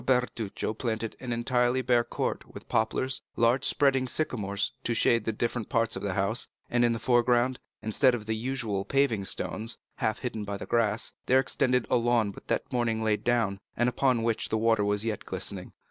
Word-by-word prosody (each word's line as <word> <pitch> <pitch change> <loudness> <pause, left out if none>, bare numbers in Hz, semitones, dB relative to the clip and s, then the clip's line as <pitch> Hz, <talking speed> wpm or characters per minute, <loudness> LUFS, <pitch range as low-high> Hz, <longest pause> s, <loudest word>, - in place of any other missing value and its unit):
Bertuccio 125 -5 0
planted 110 -1 -3
an 125 -2 -5
entirely 125 +2 +1
bare 120 -1 +3
court - - -3
with - - -11
poplars, 125 +4 0
large 120 +3 +3
spreading 135 -3 +2
sycamores 105 -9 -1
to 120 - -1
shade 115 -1 +3
the 110 - +1
different 115 0 -2
parts 115 -1 +1
of - - -4
the 100 -2 -2
house, 100 +5 0 0.2
and 120 0 +3
in 120 - +4
the 115 - 0
foreground, 120 +1 +2 0.2
instead 120 +4 +3
of 110 -3 -6
the 110 0 -1
usual 115 -4 -2
paving 125 -6 +1
stones, 110 +4 -3 0.2
half 110 - 0
hidden 115 -4 -4
by 100 -1 -4
the - - -7
grass, 115 -1 0
there 130 +1 +5
extended 125 -2 +1
a - - +3
lawn 120 -3 +2
but - - -13
that - - -2
morning 115 -2 0
laid 110 -1 +1
down, 115 -5 +1 0.2
and 120 - +3
upon 125 -1 +2
which 115 -1 0
the 110 - +1
water 110 -1 +3
was 105 +1 0
yet 110 -2 -2
glistening. 95 0 -5
115 Hz, 190 wpm, -28 LUFS, 110-125 Hz, 0.2 s, there